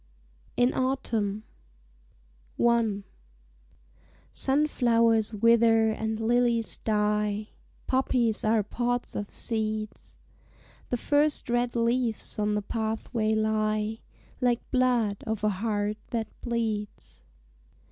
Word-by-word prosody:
IN 245 +1 +3
AUTUMN 225 -6 -1 1.2
I 230 -4 +2 1.3
Sunflowers 230 -6 +2
wither 225 0 +4
and 220 0 -3
lilies 235 0 +1
die, 210 0 0 0.4
Poppies 250 -4 +1
are 215 0 +2
pods 245 +3 -2
of 205 -1 -4
seeds; 215 -1 -3 0.7
The 245 - 0
first 290 0 +1
red 240 0 0
leaves 235 -2 0
on 210 0 +1
the 210 - -1
pathway 220 0 -1
lie, 215 0 0 0.4
Like 245 -1 +1
blood 245 -6 +1
of 220 -1 -2
a 215 - +3
heart 205 +1 -1
that 225 -2 -2
bleeds. 220 - -4
225 Hz, 95 wpm, -27 LUFS, 215-240 Hz, 1.3 s, wither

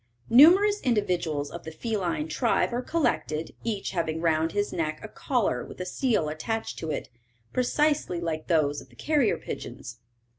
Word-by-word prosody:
Numerous 380 - +7
individuals 175 - 0
of 170 - -8
the 160 - -6
feline 170 -4 -2
tribe 235 +7 +1
are 245 - 0
collected, 245 - -1
each 220 -4 -2
having 165 -3 -1
round 160 -1 +1
his 205 +2 -1
neck 155 -2 -2
a - - -5
collar 215 - -1
with - - -11
a 180 - -3
seal 215 - 0
attached 220 +9 -3
to 160 - -4
it, - - -3 0.4
precisely 285 - +1
like 160 -2 -3
those 145 -4 +2
of 130 - -16
the 120 - -20
carrier 290 - +1
pigeons. 125 -1 -7
175 Hz, 160 wpm, -27 LUFS, 155-240 Hz, 0.4 s, Numerous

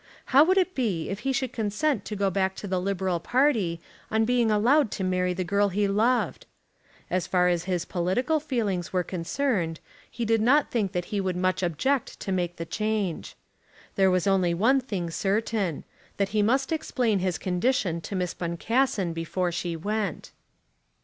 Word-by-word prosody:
How 280 +3 +9
would 375 +4 +2
it 370 -1 +2
be 205 - -1
if 195 - -4
he 270 +4 -1
should 260 -1 -2
consent 225 +4 -1
to 210 - -4
go 200 -1 +1
back 190 0 0
to 205 - -7
the 185 -1 -1
Liberal 190 -2 -1
party 225 - +1 0.3
on 220 0 +2
being 240 -1 +2
allowed 240 +6 +3
to 190 - -3
marry 185 0 +1
the 185 - -1
girl 200 +3 +2
he 200 +2 +1
loved? 225 +5 +1 0.6
As 185 -1 0
far 180 -1 +3
as 175 -1 0
his 180 -2 -1
political 195 - 0
feelings 220 - -2
were 180 -1 +1
concerned 175 - -1 0.3
he 235 - -4
did 225 0 +2
not 275 +6 +3
think 205 -5 0
that 175 -1 -2
he 200 - +1
would 185 -2 -1
much 185 +1 0
object 225 - -1
to 195 - -3
make 175 -2 -1
the 165 - -5
change. 210 -3 -2 0.6
There 190 -1 +4
was 185 -1 +1
only 185 -3 +2
one 255 +9 +3
thing 190 -9 -4
certain, 200 -2 -1 0.3
that 200 -1 0
he 215 0 +1
must 265 +7 +1
explain 245 -9 0
his 185 -1 -1
condition 180 -2 0
to 195 - -6
Miss 180 -2 -1
Boncassen 190 +2 0
before 175 +2 -2
she 170 0 -3
went. 205 +1 -3
195 Hz, 180 wpm, -26 LUFS, 180-235 Hz, 0.6 s, How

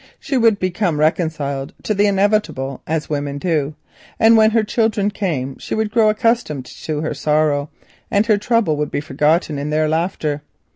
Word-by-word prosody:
She 275 - -3
would 230 -4 +4
become 185 -4 -1
reconciled 155 -2 -1
to 215 - 0
the 205 +1 +3
inevitable 195 -10 0
as 160 -1 -1
women 145 -1 -3
do, 150 -2 -1 0.4
and 225 +1 +6
when 220 -1 +6
her 225 0 +2
children 215 -2 0
came 140 -11 -3
she - - -4
would 220 -1 -1
grow 220 -1 +4
accustomed 215 - 0
to 150 +3 -5
her 155 - -2
sorrow, 150 0 +1 0.4
and 200 +2 +2
her 215 -2 +3
trouble 210 -8 +1
would 150 0 -1
be - - -2
forgotten 150 +2 0
in 145 +1 -3
their 155 +1 +1
laughter. 155 -2 -1
160 Hz, 175 wpm, -19 LUFS, 150-210 Hz, 0.4 s, and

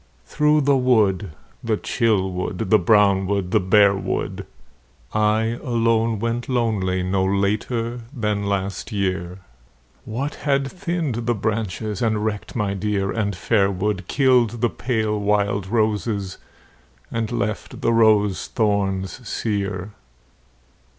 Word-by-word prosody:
Through 150 0 +2
the 140 0 +3
wood, 105 -7 +2 0.3
the 110 -2 0
chill 105 -6 0
wood, 90 +2 -3
the 110 - +6
brown 100 -4 +4
wood, 100 -2 -1
the - - +4
bare 100 +2 +5
wood, 95 - -3 0.7
I 110 +2 +1
alone 115 -2 +1
went 115 +3 -2
lonely 105 -7 0
no 95 +1 0
later 110 +5 -1
than 105 -6 -2
last 100 +2 -2
year, 95 -2 -2 0.6
What 135 +7 -3
had 140 -2 0
thinned 170 - -3
the 120 - +2
branches, 105 -1 -2
and 110 -2 0
wrecked 105 -2 -4
my 105 -4 0
dear 100 0 -1
and 100 -3 -1
fair 100 +2 +2
wood, 95 -1 -2
Killed 125 -4 +2
the 120 - +2
pale 110 -4 -1
wild 100 -1 0
roses 105 -3 -1 0.7
and 115 -1 -2
left 110 -3 -3
the 115 - +2
rose 105 -4 +3
thorns 100 0 -1
sere 100 -2 -2
105 Hz, 125 wpm, -22 LUFS, 100-115 Hz, 0.7 s, the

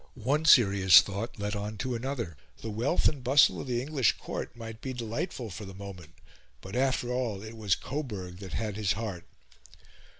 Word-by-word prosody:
One 135 +6 0
serious 100 - +8
thought 100 +4 -5
led 105 +1 -2
on 105 +1 -4
to 130 +2 -2
another. 115 - -3 0.3
The 110 - -4
wealth 120 +10 +1
and 150 - 0
the - - -13
bustle 135 +3 +4
of - - -8
the 120 -1 0
English 135 -6 +2
Court - - -6
might 115 -1 -8
be 130 - -4
delightful 120 - -4
for 105 - -7
the 95 -1 -10
moment, 95 -5 -10 0.4
but, 95 - -9
after 130 -1 +1
all, 115 -6 -2
it 110 +1 -9
was 105 -5 +1
Coburg 105 -11 -5
that 95 -2 -9
had 105 -2 -2
his 105 -1 +1
heart. 105 -5 -5
110 Hz, 190 wpm, -29 LUFS, 100-125 Hz, 0.4 s, serious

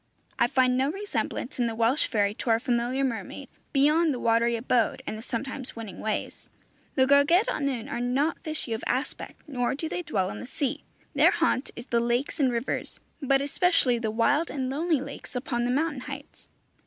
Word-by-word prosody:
I 235 - +5
find 255 -1 +3
no 270 +2 +2
resemblance 390 -8 -4
in 240 - +2
the 225 - -3
Welsh 230 +6 +3
fairy 205 -3 +1
to 230 - -5
our 225 0 +4
familiar 245 +2 0
mermaid, 240 -4 -4 0.2
beyond 305 +4 +4
the - - -5
watery 230 +1 +2
abode, 235 0 +1
and - - -4
the 215 - -7
sometimes 260 +2 -5
winning 225 -4 -7
ways. 215 -1 -3 0.5
The 260 - +5
Gwragedd 285 - +5
Annwn 270 - -2
are 280 -4 -3
not 265 +7 0
fishy 310 -7 -4
of 225 - -4
aspect, 260 +4 -3
nor 250 -2 -1
do 320 +3 -3
they 355 +2 -3
dwell 195 - -1
in - - -7
the 250 - -8
sea. 270 0 -2 0.3
Their - - +6
haunt 255 - +1
is 240 - -8
the 235 -3 +1
lakes 240 +6 -1
and 265 -3 +3
rivers, 235 +2 -3 0.2
but 275 0 +3
especially 285 -5 +2
the 225 -1 -1
wild 285 +9 +2
and 260 -2 -2
lonely 310 0 +1
lakes 280 -1 -9
upon 240 -1 -1
the - - 0
mountain 290 0 0
heights. 280 +1 -9
260 Hz, 190 wpm, -27 LUFS, 235-285 Hz, 0.5 s, Their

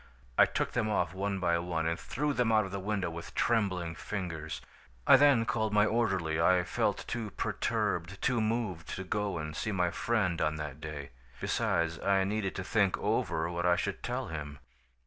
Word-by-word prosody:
"I - - +7
took - - -1
them 110 -3 0
off 105 - 0
one 100 +1 -2
by 85 -2 +2
one 85 -2 -2
and 80 0 0
threw 150 +2 -1
them 125 -4 +2
out 110 -1 +4
of 95 - -7
the 100 - -3
window 100 -3 -1
with 85 0 -8
trembling 95 -8 +1
fingers. 80 -8 -5 0.5
"I - - +9
then 135 -4 +5
called 110 -2 0
my 105 0 +5
orderly. 95 -9 +1
I 90 +1 +4
felt 85 - -1
too 115 -3 -3
perturbed, 90 -1 -1
too 125 -3 +1
moved, 110 -7 -1
to 95 - -4
go 105 0 -1
and 75 -1 -5
see 110 - -2
my 90 -3 +1
friend 100 -7 0
on 75 0 +1
that 75 -1 -6
day. 75 -2 -6 0.3
Besides, 85 0 0
I 100 -1 +2
needed 100 0 -1
to 95 - -3
think 100 -1 +2
over 80 0 0
what 85 +1 -1
I 90 - +5
should 100 +2 -2
tell 125 0 -3
him. 75 -2 -5
95 Hz, 190 wpm, -31 LUFS, 85-110 Hz, 0.5 s, I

